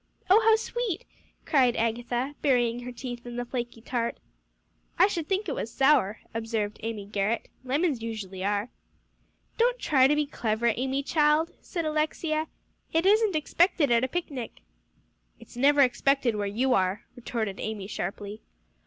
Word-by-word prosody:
"Oh, 425 +4 +8
how 445 - +7
sweet!" 450 -4 -3 0.4
cried 255 -5 +3
Agatha, 240 +4 -1
burying 245 -4 +2
her 245 0 -7
teeth 245 -1 -7
in 240 -1 -8
the 245 0 -3
flaky 240 -2 -5
tart. 235 0 -2 0.8
"I 365 - +7
should 340 -6 -2
think 390 +1 0
it 295 - -1
was 225 - -4
sour," 270 -7 +3
observed 225 -2 -2
Amy 220 -2 -4
Garrett; 205 +3 -1
"lemons 275 0 0
usually 200 -5 -5
are." 205 +3 0 0.9
"Don't - - +3
try 265 - +4
to 295 - +3
be 300 0 +1
clever, 230 -4 0
Amy 265 +2 -1
child," 305 +2 +2
said 340 -3 -4
Alexia, 310 +1 -1 0.4
"it 325 +2 +1
isn't 420 -1 +4
expected 310 -2 +2
at 235 +1 +4
a - - +2
picnic." 275 -5 -5 0.8
"It's - - -15
never 280 +3 +4
expected 265 0 +3
where 205 -1 -1
you 245 +6 +1
are," 190 -1 +1
retorted 225 -5 -3
Amy 215 -3 -4
sharply. 200 +2 -5
250 Hz, 155 wpm, -27 LUFS, 225-305 Hz, 0.9 s, Oh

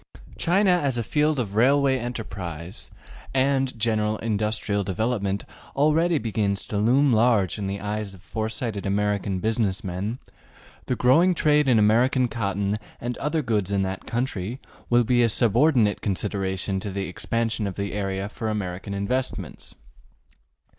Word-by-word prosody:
China 190 +3 +3
as 145 -8 +2
a 120 - 0
field 150 +5 +1
of 110 -6 -2
railway 135 +3 +4
enterprise 95 -8 -5 0.5
and 135 -1 +1
general 110 -1 +1
industrial 105 -1 -1
development 100 0 -1 0.3
already 155 +4 +3
begins 105 -4 -1
to 105 - -2
loom 130 +5 +4
large 110 -4 +3
in 100 - -2
the 100 +1 -3
eyes 105 0 -4
of 90 - -17
foresighted 110 -1 -3
American 100 -1 0
business 110 0 0
men; 95 +5 -3 0.7
the 125 - 0
growing 165 +10 +4
trade 150 -2 +3
in 125 -3 +5
American 120 +5 +3
cotton 100 -2 -2 0.2
and 120 0 -3
other 150 +2 -1
goods 105 -6 0
in 100 -1 +1
that 95 0 -5
country 120 -1 -2 0.3
will 120 0 +4
be 120 +1 +3
a 115 - +4
subordinate 115 +1 +3
consideration 95 -1 -1
to 100 - -5
the 100 0 -3
expansion 115 +3 -2
of 95 - -5
the 100 0 -3
area 95 -1 -2
for 110 +1 -4
American 100 -1 -4
investments. 125 +7 -3
110 Hz, 145 wpm, -24 LUFS, 100-125 Hz, 0.7 s, in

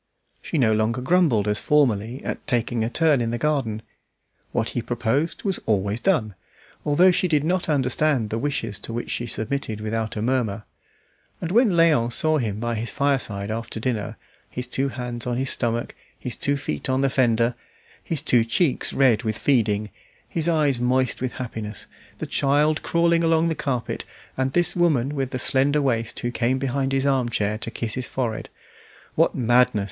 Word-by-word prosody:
She 165 - -3
no 115 -6 +3
longer 110 +3 0
grumbled 130 - +2
as 105 0 +1
formerly 125 -4 +1
at - - -5
taking 120 -3 0
a 115 - -1
turn 155 -1 +3
in 115 - -1
the 120 - -2
garden; 120 -6 -1 0.7
what 115 -2 0
he 120 - -2
proposed 120 +6 -1
was 195 -3 -1
always 100 +1 0
done, 125 - +1 0.5
although 175 +6 +5
she 180 - +1
did 150 -4 +2
not 175 +2 0
understand 135 -4 +1
the 115 - -1
wishes 130 -7 -2
to 115 - -7
which 120 - -4
she 120 - -3
submitted 110 0 -3
without 110 +1 -3
a 105 - -3
murmur; 115 -4 0 0.8
and 170 - -4
when 235 +3 +5
Léon 155 -9 +3
saw 155 +5 +2
him 105 -4 -2
by 120 +1 -2
his 115 +1 -3
fireside 115 -8 -1
after 115 0 -4
dinner, 115 -3 -2 0.3
his 125 - -4
two 135 +2 -1
hands 125 -2 -4
on 120 -1 -1
his 130 +1 0
stomach, 120 -1 -1 0.2
his 125 - -5
two 140 0 0
feet 75 - -4
on 130 +1 +1
the 135 - +3
fender, 120 -2 +2 0.5
his 160 -5 -3
two 120 -2 +4
cheeks 130 +6 0
red 125 -6 +4
with 110 -3 -2
feeding, 105 -6 +1 0.4
his 165 0 -1
eyes 150 -6 +2
moist 125 +1 +1
with 130 -1 -2
happiness, 110 -4 -6 0.3
the - - -4
child 150 +3 +2
crawling 170 0 +2
along 165 0 +3
the - - +1
carpet, 135 -6 -3 0.3
and 130 0 -1
this 175 -1 +1
woman 150 -6 +2
with 135 -3 -2
the 130 - -3
slender 135 +3 +2
waist 115 -5 -1
who 120 - -2
came 125 +1 0
behind 135 0 -1
his 135 0 +1
arm 130 -3 +2
chair 105 -1 -1
to 115 - -2
kiss 115 -1 -3
his 130 - -2
forehead: 120 -4 -3 0.6
"What - - +2
madness!" 125 -1 +3
125 Hz, 180 wpm, -23 LUFS, 115-145 Hz, 0.8 s, although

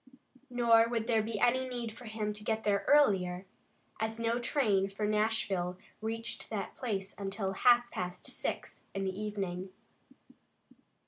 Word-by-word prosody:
Nor 230 -2 +5
would 230 -2 -1
there 225 -2 +3
be 215 -1 -3
any 255 +2 +3
need 240 -2 -3
for 240 +3 -12
him 215 -1 -2
to 210 0 -8
get 220 0 -1
there 200 -1 +2
earlier, 195 -10 +4 0.5
as 220 +1 -2
no 230 +1 +1
train 210 -7 +2
for 200 +2 -3
Nashville 210 -4 0 0.2
reached 225 +1 -4
that 205 -3 -4
place 200 -6 -3
until 195 0 -2
half 240 +3 +5
past 180 0 -4
six - - -4
in 195 - -1
the 190 -1 -2
evening. 195 -3 -3
215 Hz, 145 wpm, -32 LUFS, 195-230 Hz, 0.5 s, Nor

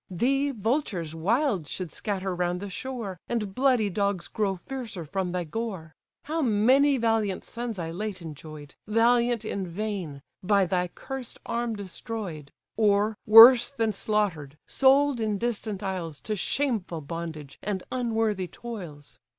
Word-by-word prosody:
Thee, 270 +10 +1
vultures 220 - -1
wild 200 - 0
should 180 -1 -5
scatter 195 -3 -3
round 175 0 -1
the 200 0 -6
shore, 225 -5 -5
And 210 -5 -2
bloody 255 -3 +3
dogs 200 -2 -1
grow 200 -3 -1
fiercer 215 -3 -6
from 185 +3 -2
thy 180 0 -1
gore. 180 -3 -5 0.3
How 320 +2 -2
many 260 +4 +4
valiant 225 -4 0
sons 235 -2 -5
I 165 -2 -4
late 205 +2 -4
enjoy'd, 155 -2 -10
Valiant 235 +1 +3
in 195 -3 -3
vain! 175 -6 -4 0.2
by 200 0 +3
thy 180 0 0
cursed 265 +6 -7
arm 235 -1 -2
destroy'd: 190 - -6 0.3
Or, 210 0 +3
worse 230 +3 +10
than 225 -6 0
slaughtered, 195 -9 -1
sold 275 0 +4
in 215 -2 0
distant 215 -2 -3
isles 175 -6 -4
To 215 - -2
shameful 210 - -1
bondage, 155 -2 -7
and 195 -3 -3
unworthy 225 -6 0
toils. 175 - -9
205 Hz, 140 wpm, -27 LUFS, 180-235 Hz, 0.3 s, worse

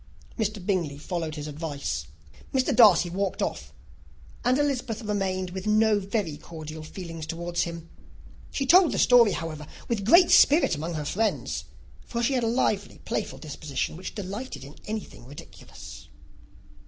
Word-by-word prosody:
Mr. 215 -2 -1
Bingley 175 -8 0
followed 160 0 -4
his 150 -1 -5
advice. 150 -1 -4 0.4
Mr. 260 -2 +1
Darcy 200 -7 +7
walked 190 +2 -2
off; - - -4 0.7
and 250 +1 +3
Elizabeth 255 -6 -1
remained 190 -3 -2
with 190 +2 -5
no 215 0 +4
very 195 -6 -2
cordial 155 0 -9
feelings 165 -1 -7
towards 170 +1 -2
him. 170 -1 -4 0.6
She 275 - -2
told 345 +3 +6
the - - -1
story, 235 -4 +6
however, 155 -3 -5 0.2
with 225 -4 -1
great 340 - +6
spirit 300 - +6
among 160 +2 -3
her 150 -1 -3
friends; 215 +8 -1 0.4
for 235 0 -3
she 270 - +2
had 250 -2 +1
a - - +1
lively, 215 -4 0
playful - - -3
disposition, 150 -2 -4
which 185 +3 -7
delighted 200 - -6
in 140 +2 -11
anything 215 - -6
ridiculous. 145 +2 -12
190 Hz, 150 wpm, -26 LUFS, 160-225 Hz, 0.7 s, Darcy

